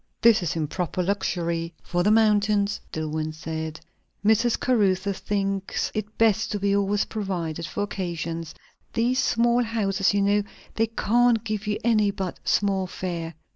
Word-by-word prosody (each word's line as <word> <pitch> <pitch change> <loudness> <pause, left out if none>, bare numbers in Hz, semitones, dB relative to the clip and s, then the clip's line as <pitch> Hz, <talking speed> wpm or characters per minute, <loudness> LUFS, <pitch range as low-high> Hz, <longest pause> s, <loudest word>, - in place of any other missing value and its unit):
"This 230 -3 +6
is 170 -3 -2
improper 170 +3 -2
luxury 170 -3 -1
for 175 - -1
the 195 - +3
mountains," 210 -2 +3
Dillwyn 155 0 -3
said. 160 -1 -5 0.5
"Mrs. 225 +2 +3
Caruthers 200 -5 +1
thinks 195 -1 -1
it 215 0 -4
best 220 -1 +3
to 205 - -1
be 200 0 +2
always 200 +1 +1
provided 175 -6 -3
for 205 - -2
occasions. 170 -4 -4 0.4
These 245 +3 +1
small 235 +1 +3
houses, 205 -5 +1
you 200 -1 +1
know, 205 +1 +3 0.3
they 225 0 +1
can't 230 +1 +2
give 215 -1 -3
you 210 0 0
any 215 -3 +3
but 190 -2 -4
small 195 -2 +1
fare." 170 -3 -5
200 Hz, 145 wpm, -25 LUFS, 175-215 Hz, 0.5 s, This